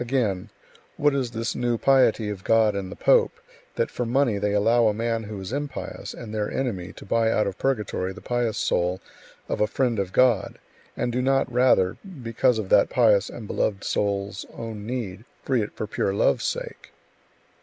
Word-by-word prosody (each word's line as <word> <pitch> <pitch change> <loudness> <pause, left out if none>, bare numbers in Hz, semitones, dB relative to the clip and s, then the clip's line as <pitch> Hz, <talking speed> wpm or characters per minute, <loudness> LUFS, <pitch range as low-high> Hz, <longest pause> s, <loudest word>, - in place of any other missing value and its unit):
Again: 115 -7 -1 0.5
"What 145 0 +3
is 135 -3 -1
this 115 0 -3
new 120 -1 0
piety 125 -4 +3
of 95 -2 -7
God 110 -2 +4
and 95 -2 -4
the - - -7
pope, 475 -2 +3 0.4
that 475 - -1
for - - -2
money 120 -3 +1
they 105 0 0
allow 115 +3 +4
a 105 - +1
man 115 0 -1
who 105 -1 -6
is 95 +5 -6
impious 145 -1 -5
and 110 -3 -8
their 105 -1 -1
enemy 100 -9 -3
to - - -12
buy 115 +2 +2
out 105 - +2
of 100 -1 -4
purgatory 105 -8 -1
the - - -10
pious 120 -2 -1
soul 90 +1 0 0.5
of - - -2
a 105 - +4
friend 120 -1 0
of 95 -2 -2
God, 120 -5 +2 0.4
and 120 - -1
do 125 +2 0
not 135 -1 +1
rather, 120 -7 +3 0.3
because 115 +1 +2
of 105 -4 -4
that - - +5
pious 105 -5 +3
and 120 - -8
beloved 100 -1 -1
soul's 100 -1 -1
own 110 -2 -6
need, 115 -5 -4 0.2
free 130 -4 +1
it 105 - -4
for - - -3
pure 100 -1 -1
love's - - +2
sake?" - - -5
115 Hz, 190 wpm, -25 LUFS, 100-125 Hz, 0.5 s, that